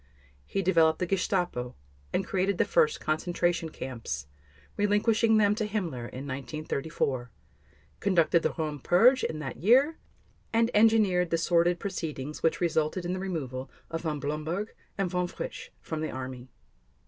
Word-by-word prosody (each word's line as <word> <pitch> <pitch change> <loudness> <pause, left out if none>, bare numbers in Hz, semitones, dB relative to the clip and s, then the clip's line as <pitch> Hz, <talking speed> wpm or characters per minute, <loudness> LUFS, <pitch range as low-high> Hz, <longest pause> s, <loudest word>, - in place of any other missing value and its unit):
He 195 - -1
developed 165 -3 +4
the 180 - -1
Gestapo, 175 -9 -1 0.4
and 190 - 0
created 190 0 0
the - - +3
first 460 -1 +2
concentration 170 +1 0
camps, 115 - -5 0.5
relinquishing 215 +2 +3
them 205 -1 +4
to 215 0 -2
Himmler 165 - -3
in 130 +2 -7
1934, 135 -1 -3 0.7
conducted 170 -3 +3
the - - +1
Röhm 150 -4 -3
purge 245 - +5
in 155 - -1
that 155 - -5
year, 265 - +4 0.5
and 230 +1 +2
engineered 210 -5 +4
the 165 - +2
sordid 170 +1 +2
proceedings 155 -7 -4
which 165 - +1
resulted 170 +1 0
in 175 - -1
the 185 - -3
removal 135 -9 -4 0.2
of 165 0 -2
Von 155 -3 -2
Blomberg 155 +8 -3 0.2
and 195 -2 +1
Von 180 0 -1
Fritsch - - -7
from 160 -1 -4
the 155 - -2
Army. 130 -1 -6
175 Hz, 150 wpm, -28 LUFS, 150-200 Hz, 0.7 s, purge